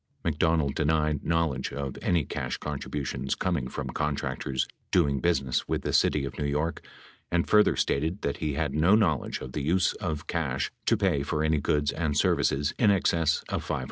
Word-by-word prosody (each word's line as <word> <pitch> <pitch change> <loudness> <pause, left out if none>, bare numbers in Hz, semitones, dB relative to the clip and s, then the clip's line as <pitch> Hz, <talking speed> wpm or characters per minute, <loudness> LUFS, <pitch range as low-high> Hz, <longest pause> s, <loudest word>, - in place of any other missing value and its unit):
McDonald 80 -2 +1
denied 75 -1 +1
knowledge 80 -6 0
of 70 -2 -4
any 85 -3 +2
562 - - -11
cash 60 - -3
contributions 70 -2 -3
coming 85 -9 -1
from - - -5
contractors 70 -2 -2 0.2
doing 70 -6 +2
business 65 -6 0
with - - -1
the - - -2
city 70 -2 +3
of 70 - -7
New 75 - -1
York 75 +3 -1 0.5
and 85 -1 +1
further 105 0 +5
stated 80 +7 -1
that 70 - -1
he 75 -3 -2
had 75 -2 -1
no 80 +7 +4
knowledge 80 - +1
of 65 - -7
the 75 - -3
use 85 +6 +2
of 80 -5 -4
cash 70 -6 -2 0.2
to - - +4
pay 70 - +1
for 75 +2 -1
any 80 -1 +2
goods 75 0 +1
and 75 -3 -1
services 70 +2 +2
in 110 - +5
excess 85 -5 +2
of - - -2
$500. - - -2
75 Hz, 185 wpm, -27 LUFS, 70-85 Hz, 0.5 s, further